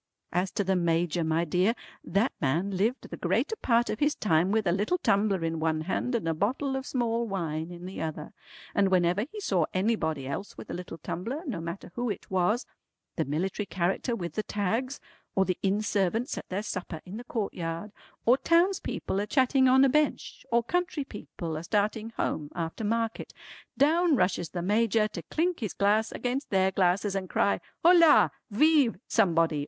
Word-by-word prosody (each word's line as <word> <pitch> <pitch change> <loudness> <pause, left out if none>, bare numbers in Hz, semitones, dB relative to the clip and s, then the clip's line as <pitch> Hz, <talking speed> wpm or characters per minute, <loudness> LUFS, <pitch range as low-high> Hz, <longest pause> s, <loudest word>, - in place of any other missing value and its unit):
As 180 +2 0
to 205 - 0
the 190 0 +1
Major 170 -1 +1
my 160 +1 +1
dear 180 +8 +2 0.3
that 200 +8 +1
man 165 +8 +1
lived 210 +7 0
the - - -7
greater 445 - 0
part 235 -1 +2
of 215 - -4
his 295 0 +2
time 170 -1 +2
with 220 -1 +1
a 175 - +3
little 205 - +1
tumbler 200 - +1
in 165 0 -2
one 160 -1 0
hand 215 +9 -1
and 215 -8 -1
a 165 - +2
bottle 260 - -1
of 265 +1 -4
small 235 -2 0
wine 165 -5 -3
in 175 0 -9
the 185 - -6
other, 155 -1 -5 0.4
and 200 -1 +3
whenever 180 +3 +2
he 430 - -7
saw 185 - +1
anybody 175 -8 0
else 140 +9 -5
with - - -8
a - - -3
little 180 -2 -6
tumbler, 230 - -4
no 205 - -3
matter 170 +2 -6
who 240 +2 -2
it 200 - -6
was, 190 +7 +1 0.5
the 160 - 0
military 185 +8 -2
character 190 +7 -1
with 175 -6 -5
the 215 - -1
tags, 225 +7 -2 0.4
or 190 - +3
the 185 -2 -2
inn 200 +2 +1
servants 210 +4 0
at - - -8
their 195 +3 -2
supper 185 -6 -5
in 190 +3 -7
the 240 - -7
courtyard, 195 -5 -4 0.3
or 250 +4 +5
townspeople 340 - +1
a 205 - -2
chatting 260 0 +3
on 265 +1 +6
a - - +5
bench, 300 +2 0
or 235 0 +3
country 350 +1 -1
people 175 -8 -7
a 155 - -5
starting 215 +3 0
home 150 -2 -2
after 165 +5 -4
market, 225 +1 -2 0.4
down 320 +4 +4
rushes 180 -7 +1
the 175 -2 -4
Major 215 +2 +2
to - - -6
clink 345 +2 -1
his 215 -5 -3
glass 210 +2 +2
against 255 +3 -3
their 190 -1 +3
glasses 190 +2 +1
and 190 -2 -3
cry, 200 - +1 0.2
Hola! 335 -3 +7 0.2
Vive 280 - +4
Somebody! 165 -7 +2
200 Hz, 190 wpm, -28 LUFS, 175-235 Hz, 0.5 s, Hola